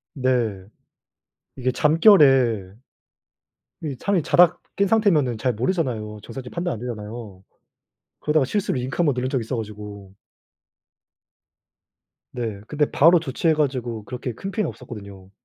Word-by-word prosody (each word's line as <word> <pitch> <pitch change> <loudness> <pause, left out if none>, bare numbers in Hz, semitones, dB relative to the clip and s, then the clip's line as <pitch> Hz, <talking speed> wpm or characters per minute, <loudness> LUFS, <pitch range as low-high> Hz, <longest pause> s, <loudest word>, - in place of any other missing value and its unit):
네. 120 -8 0 0.9
이게 130 -1 -1
잠결에 135 - +4 1.1
이 145 -4 -4
사람이 195 +1 +1
자다 175 +3 +4 0.2
깬 200 - +2
상태면은 170 - +2
잘 125 +3 0
모르잖아요. 115 - -2
정상적인 125 +2 -8
판단 170 -6 -2
안 - - -7
되잖아요. 110 -4 -7 0.8
그러다가 150 -2 +2
실수로 200 +4 -1
링크 125 +2 -4
1 175 - +3
번 145 - +2
누른 125 +1 -2
적 130 - 0
있어 115 +3 -4
가지고 105 -3 -8 2.2
네 110 -5 -4
근데 150 -1 0
바로 165 +4 +6
조치해 160 +2 0
가지고 125 -7 -2
그렇게 125 0 -5
큰 195 - -6
피해는 210 -3 -1
없었거든요. 100 -6 -11
125 Hz, 290 characters per minute, -23 LUFS, 110-155 Hz, 2.2 s, 바로